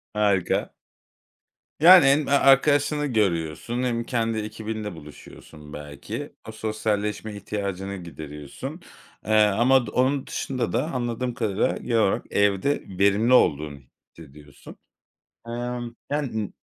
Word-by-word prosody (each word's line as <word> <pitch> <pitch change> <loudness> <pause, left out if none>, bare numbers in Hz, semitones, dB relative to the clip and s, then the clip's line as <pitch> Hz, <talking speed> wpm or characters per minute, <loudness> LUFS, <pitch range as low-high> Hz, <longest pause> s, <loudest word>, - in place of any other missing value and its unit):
Harika. 100 -4 +1 1.1
Yani 175 -1 +9
hem 140 +2 +3
arkadaşını 145 +2 +4
görüyorsun 105 - -1
hem 120 -2 -1
kendi 115 -2 -1
ekibinle 110 -1 -5
buluşuyorsun 75 -1 -13
belki. 75 -1 -7 0.2
O 110 - -6
sosyalleşme 110 -1 -2
ihtiyacını 100 -1 -4
gideriyorsun. 75 -4 -8 0.5
Iıı, 105 -1 +4
ama 120 +5 +4
od 120 -4 +1
onun 130 +2 +1
dışında 130 -2 -3
da 130 +8 -1
anladığım 125 -1 -3
kadarıyla, 110 -4 0
genel 115 -2 0
olarak, 95 - 0
evde 100 +7 +1
verimli 100 +5 +3
olduğunu 75 - +2 0.3
hissediyorsun. 75 -2 -15 0.7
Imm. 120 0 -4 0.2
Yani 130 -8 -2
n - - -18
110 Hz, 110 wpm, -24 LUFS, 95-125 Hz, 1.1 s, Yani